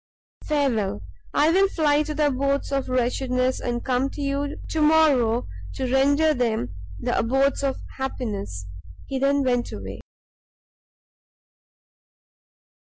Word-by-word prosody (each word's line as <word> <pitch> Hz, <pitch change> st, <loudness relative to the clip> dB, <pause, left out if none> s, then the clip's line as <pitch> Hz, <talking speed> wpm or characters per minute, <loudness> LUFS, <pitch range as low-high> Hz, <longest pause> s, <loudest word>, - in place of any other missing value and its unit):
Farewell; 235 Hz, -, 0 dB, 0.3 s
I 305 Hz, +2 st, +3 dB
will 390 Hz, +3 st, +4 dB
fly 300 Hz, -5 st, +2 dB
to 305 Hz, 0 st, -3 dB
the 305 Hz, 0 st, +2 dB
abodes 275 Hz, 0 st, 0 dB
of 275 Hz, -1 st, -1 dB
wretchedness, 255 Hz, +1 st, 0 dB
and 240 Hz, -1 st, -3 dB
come 260 Hz, +1 st, +1 dB
to 290 Hz, -, -7 dB
you 280 Hz, +1 st, -2 dB
to 315 Hz, -, -1 dB
morrow 290 Hz, -7 st, +4 dB, 0.3 s
to 255 Hz, -1 st, -2 dB
render 285 Hz, +4 st, +4 dB
them 220 Hz, -, -1 dB, 0.2 s
the -, -, -1 dB
abodes 270 Hz, +4 st, +1 dB
of 275 Hz, -1 st, -1 dB, 0.2 s
happiness." 210 Hz, -, -4 dB, 0.4 s
He 270 Hz, -, -3 dB
then 280 Hz, +1 st, +2 dB
went 245 Hz, -2 st, 0 dB
away. 95 Hz, 0 st, -7 dB
270 Hz, 120 wpm, -24 LUFS, 245-285 Hz, 0.4 s, will